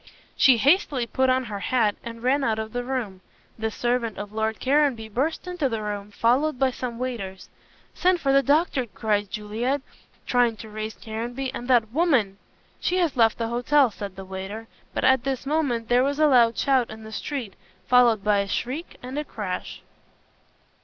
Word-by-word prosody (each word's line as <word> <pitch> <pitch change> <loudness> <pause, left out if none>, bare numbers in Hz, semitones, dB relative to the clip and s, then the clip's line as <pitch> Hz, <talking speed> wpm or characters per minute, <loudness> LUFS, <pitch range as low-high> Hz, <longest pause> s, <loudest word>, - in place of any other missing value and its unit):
She 260 -3 +6
hastily 280 - +3
put 260 +2 +1
on 260 0 +2
her 210 -4 -5
hat 220 -1 +1
and 230 0 -8
ran 270 +3 +2
out 225 -4 +1
of 220 0 -5
the 245 0 -2
room. 240 -8 -4 0.4
The 220 0 -1
servant 240 0 -1
of 205 0 -6
Lord 220 0 -1
Caranby 265 -5 +1
burst 275 - -1
into 355 -6 -1
the 225 -2 -3
room, 205 -1 -4
followed 255 +7 +1
by 265 0 +2
some 245 -2 -5
waiters. 215 -7 -5 0.4
"Send 365 0 +2
for 275 -3 +1
the 275 - +6
doctor," 285 -3 +2
cried 210 -2 -1
Juliet, 225 +7 -2 0.5
trying 245 -2 +2
to 220 - -10
raise 215 0 -5
Caranby 240 +4 -5
"and 245 - -6
that 235 -4 +3
woman 255 - +2 0.2
" - - -36
"She 365 - 0
has 340 -6 +1
left 225 -3 +4
the 230 -1 -2
hotel," 245 +2 +3
said 200 -2 -7
a 195 - -7
waiter, 190 +4 -7 0.2
but - - -3
at 260 -2 +4
this 270 0 -2
moment 275 -6 0
there 245 +1 +4
was 280 +1 0
a 310 - +4
loud 240 -5 +5
shout 265 -4 +2
in 220 0 -9
the 220 - -10
street, 235 -2 -4 0.3
followed 240 -4 +4
by 210 -1 +3
a 200 - -1
shriek 270 - -4
and 260 +3 -4
a - - -2
crash. 205 -9 -6
240 Hz, 190 wpm, -25 LUFS, 220-270 Hz, 0.5 s, She